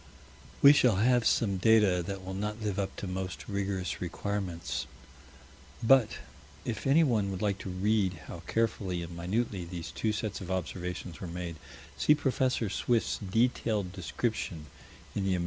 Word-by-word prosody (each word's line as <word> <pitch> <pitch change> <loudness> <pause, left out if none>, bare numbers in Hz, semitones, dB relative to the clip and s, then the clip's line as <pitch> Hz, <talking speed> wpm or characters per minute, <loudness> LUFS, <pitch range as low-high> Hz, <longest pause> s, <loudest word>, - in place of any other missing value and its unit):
We 140 +1 +11
shall 125 -7 +4
have 120 +3 +3
some 100 -4 +2
data 105 -3 +4
that 95 -1 -5
will 95 - -5
not 105 +3 -3
live 105 -2 -2
up 95 -1 -2
to - - -5
most 95 0 -4
rigorous 100 -2 -2
requirements, 85 -7 -3 1.0
but, 120 -2 +5 0.5
if 115 +1 -3
anyone 130 -9 +4
would 95 +1 -4
like 100 -2 0
to 95 - -6
read 95 +1 +1
how 85 - -8
carefully 95 -6 0
and 85 0 -8
minutely 95 +3 -1
these 85 -1 -6
two 110 - 0
sets 105 -1 -3
of 90 - -7
observations 90 -2 -4
were 90 - -4
made, 85 -1 -5 0.4
see 150 - +5
Prof. 140 -3 -1 0.3
Swift's 120 -2 +1
detailed 105 -1 +1
description 95 -4 -3 0.5
in 100 - -1
the 95 -1 +2
_Am. - - -1
100 Hz, 155 wpm, -30 LUFS, 90-110 Hz, 1.0 s, We